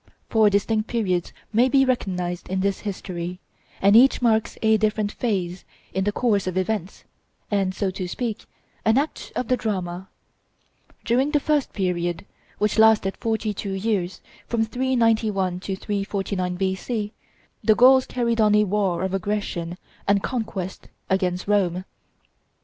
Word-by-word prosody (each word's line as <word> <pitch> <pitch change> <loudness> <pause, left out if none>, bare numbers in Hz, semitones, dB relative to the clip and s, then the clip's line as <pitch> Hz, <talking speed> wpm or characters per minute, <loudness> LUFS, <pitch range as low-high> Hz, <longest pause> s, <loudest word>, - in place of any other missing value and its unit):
Four 220 -2 +5
distinct 215 +2 +1
periods 190 -7 -1 0.2
may 240 +4 +4
be 270 0 +4
recognized 180 -8 -2
in 190 0 -1
this 195 0 0
history; 180 -3 -5 0.4
and 200 +2 +6
each 260 +4 +6
marks 220 -3 +1
a 220 0 +5
different 215 -1 0
phase 190 -7 -2 0.3
in 190 0 0
the 205 - +2
course 205 -4 +1
of 185 0 -2
events, 190 -1 -2 0.5
and, 195 -2 +1
so 195 -2 -1
to 185 -1 -4
speak, 225 +3 -4 0.4
an 220 +2 +3
act 295 +3 -2
of 250 - -2
the 255 - +3
drama. 185 -5 -3 1.0
During 255 +5 +2
the 295 -1 +2
first 295 -1 0
period, 175 -2 -2 0.3
which 210 +1 +1
lasted 220 -3 +5
forty 220 -1 -1
two 200 0 -4
years, 190 -3 -1 0.3
from 225 -1 +1
391 220 -7 +1
to 190 +1 -4
349 195 -2 -2
B.C., 205 +4 -2 0.5
the 215 - +5
Gauls 260 +2 +6
carried 235 -2 0
on 210 -1 +5
a 210 - +5
war 195 -3 0
of 190 0 -2
aggression 190 -3 -2 0.3
and 200 0 +3
conquest 215 -7 -4 0.2
against 185 -1 0
Rome. 185 -3 +1
205 Hz, 145 wpm, -24 LUFS, 185-225 Hz, 1.0 s, and